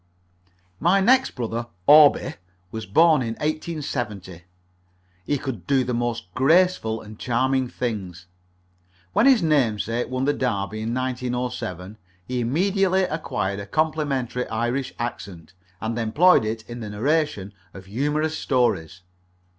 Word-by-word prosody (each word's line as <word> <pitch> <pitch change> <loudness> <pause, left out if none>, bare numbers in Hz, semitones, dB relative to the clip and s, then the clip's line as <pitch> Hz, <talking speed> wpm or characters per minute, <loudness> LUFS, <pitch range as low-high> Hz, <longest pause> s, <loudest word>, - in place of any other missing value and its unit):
My 180 +5 +3
next 255 +7 +3
brother, 120 -1 -3 0.2
Orby, 150 0 +6 0.4
was 110 -2 -6
born 155 - +5
in 115 -2 -3
1870. 125 - -4 0.9
He 145 - +1
could 130 -4 -6
do 135 -2 +3
the 125 0 -3
most 120 -6 -3
graceful 140 - +2
and 110 0 -12
charming 130 +2 +1
things. 95 -9 -5 0.9
When 235 - +4
his 255 -8 +5
namesake 120 -6 +1
won 130 +1 -1
the 145 - +2
Derby 110 -5 -2
in 115 +2 -2
1907, 125 -6 -4 0.3
he 125 +3 -3
immediately 190 - +1
acquired 105 - -2
a 100 - -7
complimentary 145 -4 -1
Irish 120 +4 -2
accent, 100 -7 -6 0.3
and 110 +2 -3
employed 120 +6 +4
it 110 +1 -4
in 120 0 -7
the 110 -2 -6
narration 115 -3 -1 0.2
of 95 -1 -12
humorous 150 +9 -1
stories. 95 - 0
125 Hz, 125 wpm, -23 LUFS, 110-150 Hz, 0.9 s, Orby